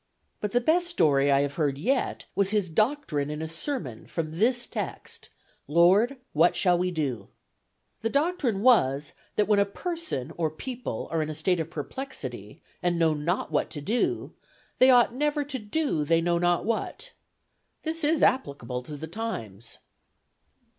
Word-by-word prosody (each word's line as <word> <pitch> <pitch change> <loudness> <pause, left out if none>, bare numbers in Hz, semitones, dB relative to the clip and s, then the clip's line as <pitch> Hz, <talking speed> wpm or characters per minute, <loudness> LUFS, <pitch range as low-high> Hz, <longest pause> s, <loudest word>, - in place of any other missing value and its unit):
"But 210 - -3
the 245 - +3
best 335 +8 +2
story 145 - +3
I 140 0 +4
have 140 0 -1
heard 145 -4 +1
yet 255 - 0
was 200 -1 +2
his 205 -5 0
doctrine 215 - 0
in 150 0 -4
a 160 - -3
sermon 160 - -3
from 160 0 -4
this 240 +3 +2
text, - - -5 0.4
'Lord, 190 - +4 0.2
what 165 +3 +4
shall 180 -2 +3
we 180 +1 0
do?' 135 - -3 0.7
The 225 - 0
doctrine 280 - 0
was 145 - +4 0.2
that 210 - +2
when 205 -1 +4
a - - +6
person 200 - -3
or 165 -2 +1
people 235 - -5
are 165 -1 +1
in 155 - -2
a 155 - -4
state 175 +3 +1
of 160 0 -3
perplexity, 145 - -7 0.2
and 175 -1 +1
know 165 -2 +3
not 160 +5 -2
what - - +1
to 150 - -6
do, 215 +12 -1 0.5
they 255 - +7
ought 240 -2 +6
never 295 +2 0
to 280 -2 -4
do 215 - -1
they 165 +2 +3
know 170 0 +1
not 175 0 +2
what. 230 - -3 0.7
This 325 0 -2
is 305 +1 +2
applicable 140 - +1
to 145 +4 -8
the 155 - -5
times." 120 - -5
175 Hz, 165 wpm, -27 LUFS, 150-245 Hz, 0.7 s, they